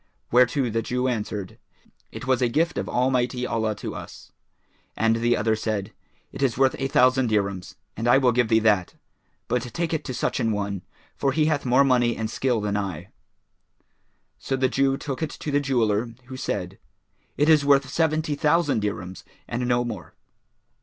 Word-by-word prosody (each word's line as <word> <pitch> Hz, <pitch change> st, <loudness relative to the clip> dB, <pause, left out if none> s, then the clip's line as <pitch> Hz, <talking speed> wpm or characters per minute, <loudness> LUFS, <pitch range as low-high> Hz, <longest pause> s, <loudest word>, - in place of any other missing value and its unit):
whereto 125 Hz, +2 st, +3 dB
the 115 Hz, +1 st, 0 dB
Jew 125 Hz, +3 st, -1 dB
answered, 105 Hz, -5 st, -4 dB, 0.5 s
"It -, -, -8 dB
was 130 Hz, -1 st, +1 dB
a 125 Hz, -, +3 dB
gift 155 Hz, -1 st, 0 dB
of 100 Hz, -, -4 dB
Almighty 125 Hz, 0 st, 0 dB
Allah 110 Hz, -3 st, -1 dB
to 100 Hz, -, -6 dB
us," -, -, -10 dB, 0.7 s
and 115 Hz, 0 st, +2 dB
the 120 Hz, +1 st, +2 dB
other 110 Hz, +1 st, +1 dB
said, 110 Hz, -2 st, -3 dB, 0.4 s
"It -, -, -8 dB
is 130 Hz, -5 st, +1 dB
worth 135 Hz, 0 st, +3 dB
a 135 Hz, -, 0 dB
thousand 130 Hz, -3 st, +3 dB
dirhams 100 Hz, -3 st, -1 dB, 0.2 s
and 115 Hz, +2 st, -3 dB
I 120 Hz, -, +6 dB
will 130 Hz, -2 st, +4 dB
give 120 Hz, 0 st, +2 dB
thee 110 Hz, -, +4 dB
that; 100 Hz, -5 st, +2 dB, 0.5 s
but 125 Hz, -, 0 dB
take 165 Hz, +8 st, -3 dB
it 160 Hz, -, -1 dB
to 130 Hz, -, -4 dB
such -, -, -1 dB
an 115 Hz, -, +1 dB
one, 100 Hz, -2 st, -3 dB, 0.3 s
for 135 Hz, -1 st, 0 dB
he 155 Hz, +1 st, +2 dB
hath 145 Hz, -4 st, 0 dB
more 130 Hz, +3 st, +5 dB
money 125 Hz, -3 st, +2 dB
and 110 Hz, -1 st, -3 dB
skill 125 Hz, -4 st, 0 dB
than 105 Hz, -1 st, -1 dB
I." 95 Hz, -6 st, -4 dB, 1.3 s
So 135 Hz, -, -2 dB
the 130 Hz, -1 st, +1 dB
Jew 135 Hz, +1 st, +1 dB
took 135 Hz, 0 st, -5 dB
it 160 Hz, -, -1 dB
to 150 Hz, -, -6 dB
the 145 Hz, -, +3 dB
jeweller, 115 Hz, -4 st, 0 dB
who 130 Hz, +1 st, -9 dB
said, 95 Hz, -7 st, -4 dB, 0.6 s
"It 150 Hz, -, +3 dB
is 155 Hz, -2 st, +5 dB
worth 140 Hz, -1 st, +4 dB
seventy 155 Hz, +1 st, 0 dB
thousand 150 Hz, -3 st, +2 dB
dirhams 95 Hz, -3 st, -4 dB, 0.2 s
and 120 Hz, +1 st, -2 dB
no 120 Hz, 0 st, +1 dB
more." 105 Hz, -7 st, -7 dB
125 Hz, 185 wpm, -24 LUFS, 110-135 Hz, 1.3 s, I